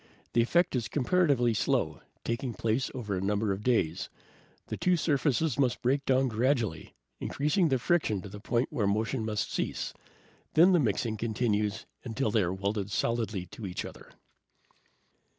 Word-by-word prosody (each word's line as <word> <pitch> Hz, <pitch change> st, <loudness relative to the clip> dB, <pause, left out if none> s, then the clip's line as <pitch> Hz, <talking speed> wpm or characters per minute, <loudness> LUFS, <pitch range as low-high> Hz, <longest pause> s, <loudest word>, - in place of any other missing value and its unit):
The 120 Hz, -, +4 dB
effect 175 Hz, +7 st, +2 dB
is 120 Hz, -4 st, -1 dB
comparatively 140 Hz, -5 st, +2 dB
slow, 105 Hz, -, 0 dB, 0.2 s
taking 115 Hz, +1 st, -2 dB
place 115 Hz, +3 st, 0 dB
over 105 Hz, -6 st, -3 dB
a 90 Hz, -, -2 dB
number 100 Hz, +1 st, 0 dB
of 95 Hz, +1 st, -2 dB
days. 95 Hz, -8 st, +1 dB, 0.6 s
The -, -, -4 dB
two 180 Hz, -1 st, +2 dB
surfaces 150 Hz, -1 st, +1 dB
must 125 Hz, -2 st, +1 dB
break 135 Hz, +3 st, +1 dB
down 130 Hz, 0 st, +3 dB
gradually, 115 Hz, -, 0 dB, 0.2 s
increasing 150 Hz, +5 st, +1 dB
the 135 Hz, -, +3 dB
friction 125 Hz, -, +1 dB
to 100 Hz, 0 st, -8 dB
a -, -, -8 dB
point 120 Hz, +6 st, -1 dB
where 110 Hz, -8 st, +1 dB
motion 110 Hz, +4 st, 0 dB
must 105 Hz, -2 st, -2 dB
cease. -, -, -2 dB, 0.6 s
Then 175 Hz, +4 st, +7 dB
the 180 Hz, -, +5 dB
mixing 110 Hz, -3 st, 0 dB
continues 110 Hz, -1 st, 0 dB, 0.2 s
until 115 Hz, -1 st, -1 dB
they 110 Hz, -, +3 dB
are 90 Hz, -2 st, 0 dB
welded 100 Hz, +1 st, -2 dB
solidly 110 Hz, -3 st, -1 dB
to 110 Hz, -, -6 dB
each 90 Hz, -, -4 dB
other." -, -, -11 dB
115 Hz, 160 wpm, -29 LUFS, 105-135 Hz, 0.6 s, Then